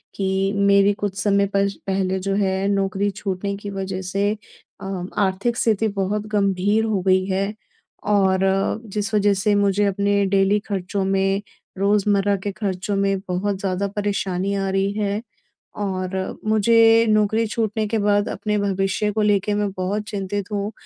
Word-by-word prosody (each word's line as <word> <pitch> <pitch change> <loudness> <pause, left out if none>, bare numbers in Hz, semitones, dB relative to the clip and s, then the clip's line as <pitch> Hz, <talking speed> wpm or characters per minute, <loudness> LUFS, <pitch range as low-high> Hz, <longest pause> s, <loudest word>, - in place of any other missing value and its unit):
कि 195 0 0
मेरी 200 0 +4
कुछ 200 -1 -4
समय 200 -1 +2
पर 200 0 +3 0.2
पहले 190 -1 0
जो 195 +1 -1
है 195 -1 0
नौकरी 195 0 0
छूटने 200 0 -3
की 205 0 -7
वजह 190 -1 -4
से 195 +2 0 0.5
अ, 195 -2 -4
आर्थिक 200 +4 0
स्थिति 220 -2 +2
बहुत 205 +2 -1
गंभीर 205 +1 +1
हो 210 -4 0
गई 185 0 +4
है। 195 +2 -1 0.5
और 195 -2 +2 0.5
जिस 210 +1 -2
वजह 205 -1 +3
से 200 +2 +1
मुझे 200 0 +2
अपने 200 0 +1
डेली 195 +1 +2
खर्चों 195 0 -2
में, 195 +1 +1 0.4
रोज़मर्रा 200 0 +2
के 205 - -2
खर्चों 200 -1 -3
में 195 0 +1
बहुत 190 +2 -1
ज़्यादा 195 0 -1
परेशानी 195 -2 -1
आ 195 -1 -1
रही 195 +1 +1
है। 205 0 -1 0.5
और 190 -1 -3
मुझे 225 +1 +5
नौकरी 215 +1 +2
छूटने 215 0 -1
के 225 - -1
बाद 205 0 +2
अपने 210 -1 -2
भविष्य 195 +1 0
को 215 +1 -1
लेके 205 0 +2
मैं 205 -1 0
बहुत 195 +3 -1
चिंतित 200 0 -4
हूँ 205 0 -2
200 Hz, 155 wpm, -22 LUFS, 195-205 Hz, 0.5 s, मुझे